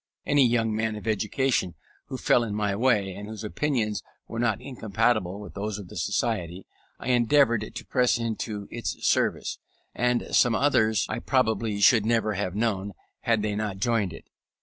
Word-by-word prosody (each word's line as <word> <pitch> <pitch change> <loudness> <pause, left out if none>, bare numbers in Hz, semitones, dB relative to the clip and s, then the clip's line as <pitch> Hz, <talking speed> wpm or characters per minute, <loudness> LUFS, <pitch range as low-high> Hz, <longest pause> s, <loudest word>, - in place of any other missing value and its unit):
Any 140 -3 +4
young 115 -2 +1
man 110 0 -1
of 105 +1 -8
education 110 -2 0 0.3
who 130 - -5
fell 120 - +3
in 105 -3 -3
my 105 -2 0
way, 105 -4 +2
and 100 +2 -8
whose 110 0 -7
opinions 110 -2 -1 0.3
were 115 - -5
not 115 -4 +1
incompatible 110 -5 -1
with 105 - -9
those 105 +1 -3
of 100 -4 -9
the - - -11
Society, 95 -1 -2 0.3
I - - -6
endeavoured 120 -2 +3
to - - -6
press 125 -3 +2
into 110 -3 -4
its 120 0 -4
service; - - +1 0.3
and 120 0 0
some 120 -2 +4
others 110 -6 +2
I 110 - -3
probably 110 -5 0
should 110 +1 +5
never 115 -2 +1
have 95 -1 -3
known, 100 -3 -1 0.3
had 115 -2 +1
they 105 -1 -1
not 105 -2 -3
joined 110 -3 0
it. 80 - -11
110 Hz, 170 wpm, -26 LUFS, 100-120 Hz, 0.3 s, should